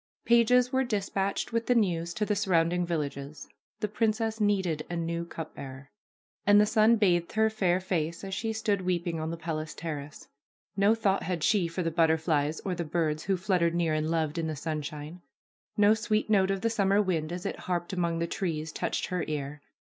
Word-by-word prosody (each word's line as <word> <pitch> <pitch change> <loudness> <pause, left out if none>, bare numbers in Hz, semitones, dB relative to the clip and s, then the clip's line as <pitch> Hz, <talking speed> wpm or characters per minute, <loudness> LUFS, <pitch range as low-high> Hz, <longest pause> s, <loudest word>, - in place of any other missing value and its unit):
Pages 245 +2 +4
were 260 0 +3
dispatched 200 -3 -2
with 230 0 0
the 245 - +3
news 170 -6 +1
to 215 - 0
the 210 - 0
surrounding 175 -3 +1
villages; 145 -3 -4 0.3
the 210 - +1
princess 220 +1 -1
needed 190 -7 +1
a 175 - -3
new 170 0 -2
cup 165 -2 -7
bearer. 135 0 -9 0.5
And 205 0 +6
the 210 - +6
sun 220 +1 +4
bathed 175 -6 +2
her 220 0 +3
fair 185 -4 +1
face 170 -3 -2
as 195 0 -5
she 220 +3 -2
stood 215 -3 0
weeping 175 -2 -1
on 155 0 -3
the 165 - -4
palace 155 -2 -4
terrace. 150 -3 -6 0.5
No 200 +3 +4
thought 200 -3 +1
had 175 -4 -3
she 200 -6 +3
for 170 +2 -3
the 165 - -1
butterflies 160 -2 +1
or 190 - -2
the 175 -1 -3
birds 155 -1 -1
who 195 -1 +1
fluttered 180 -3 +1
near 170 -2 +1
and 155 0 0
loved 160 -1 0
in 165 - -1
the 155 - -3
sunshine. 150 +2 -5 0.6
No 205 +1 +6
sweet 215 0 0
note 195 -2 +4
of 195 -1 -1
the 230 - +1
summer 200 -2 +2
wind 170 -6 0
as 175 0 -5
it - - -3
harped 175 0 -3
among 170 -2 0
the 165 - 0
trees 160 -3 -3
touched - - -2
her 180 -2 -1
ear. 145 -1 -4
175 Hz, 200 wpm, -28 LUFS, 160-205 Hz, 0.6 s, And